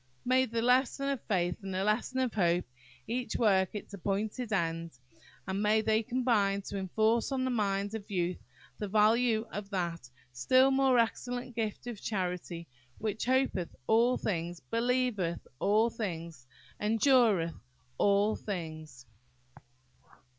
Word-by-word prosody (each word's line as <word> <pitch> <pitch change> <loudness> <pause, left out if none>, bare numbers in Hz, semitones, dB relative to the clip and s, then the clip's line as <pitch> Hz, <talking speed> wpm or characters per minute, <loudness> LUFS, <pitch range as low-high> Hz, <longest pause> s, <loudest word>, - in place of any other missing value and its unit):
May 255 +1 +4
the 230 0 -2
"Lesson 260 +3 +2
of 275 -3 -2
Faith" 175 -4 0
and 195 -1 -6
the 190 - 0
"Lesson 215 +5 0
of 255 -3 -1
Hope" 175 -3 +2 0.4
each 245 -2 -3
work 195 -4 +2
its 210 - -7
appointed 210 +5 -2
end, 165 -5 -1 0.5
and 190 +1 -1
may 215 +1 +3
they 220 0 +2
combine 220 -5 +1
to 200 - -5
enforce 220 +6 +1
on 265 -1 0
the 260 - 0
mind 200 -2 0
of 220 -2 -6
youth 180 -2 -1 0.4
the 210 - -3
value 220 +2 +3
of 200 -1 -6
that 170 -8 -3 0.2
"still 255 - +4
more 265 -1 +3
excellent 245 +1 -1
gift 220 -1 -3
of 235 -4 -6
charity," 180 -4 -3 0.3
which 215 0 -3
"hopeth 255 -9 0
all 235 - +3
things, 175 -3 -3
believeth 230 -7 0
all 215 +6 +3
thing, 170 -7 -4 0.5
endureth 220 - +3 0.5
all 205 +1 +3
things!" 155 -9 -6
210 Hz, 135 wpm, -31 LUFS, 185-240 Hz, 0.5 s, May